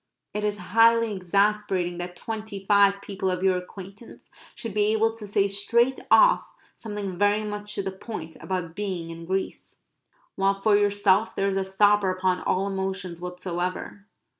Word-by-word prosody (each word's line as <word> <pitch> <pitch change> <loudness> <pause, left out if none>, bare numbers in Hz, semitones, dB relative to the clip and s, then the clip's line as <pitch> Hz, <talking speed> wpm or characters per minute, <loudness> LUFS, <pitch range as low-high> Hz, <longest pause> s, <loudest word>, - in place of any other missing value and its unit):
It 210 - -3
is 210 0 0 0.2
highly 230 -1 +5
exasperating 190 -1 0
that 175 0 -6
twenty 215 0 -6
five 200 -1 +4
people 190 -1 -3
of 180 0 -2
your 190 -1 +3
acquaintance 195 +4 -10 0.2
should 230 -4 -6
be 210 0 +2
able 225 +1 +1
to 215 -2 -9
say 200 0 +2
straight 235 +6 +1
off - - +5 0.3
something 205 -4 -6
very 205 +1 +3
much 210 0 -5
to 200 - -2
the 190 - -3
point 190 -4 -8
about 180 -3 -3
being 185 -4 -4
in 165 0 -9
Greece, 190 +1 -4 0.5
while 195 0 +1
for 205 +1 +3
yourself 205 0 +2
there 195 0 +1
is 195 - -2
a 195 - +1
stopper 205 +1 +3
upon 185 0 0
all 190 +1 0
emotions 190 -3 -4
whatsoever. 180 +2 -5
195 Hz, 165 wpm, -25 LUFS, 185-210 Hz, 0.5 s, highly